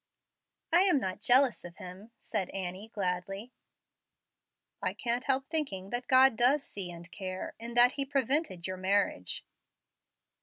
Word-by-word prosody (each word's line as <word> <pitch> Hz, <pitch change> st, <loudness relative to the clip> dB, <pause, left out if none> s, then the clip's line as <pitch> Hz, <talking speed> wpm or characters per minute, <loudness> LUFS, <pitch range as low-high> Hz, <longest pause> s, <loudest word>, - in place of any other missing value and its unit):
"I 345 Hz, -, +6 dB
am 360 Hz, -7 st, +3 dB
not 185 Hz, -5 st, -4 dB
jealous 250 Hz, +1 st, +5 dB
of 175 Hz, -1 st, -10 dB
him," 185 Hz, +5 st, -10 dB
said 200 Hz, -5 st, -3 dB
Annie, 190 Hz, +2 st, -5 dB
gladly. 195 Hz, +2 st, -4 dB, 1.3 s
"I -, -, -2 dB
can't 245 Hz, +1 st, -2 dB
help 270 Hz, 0 st, 0 dB
thinking 200 Hz, -12 st, -2 dB
that 245 Hz, +1 st, -3 dB
God 260 Hz, -1 st, +6 dB
does 260 Hz, +5 st, +3 dB
see 195 Hz, -8 st, -4 dB
and 170 Hz, +1 st, -12 dB
care, 185 Hz, -2 st, -6 dB
in 235 Hz, +1 st, -7 dB
that 245 Hz, +1 st, +7 dB
He 280 Hz, 0 st, -1 dB
prevented 270 Hz, -, 0 dB
your 185 Hz, 0 st, -4 dB
marriage." 185 Hz, -, 0 dB
220 Hz, 145 wpm, -30 LUFS, 185-260 Hz, 1.3 s, that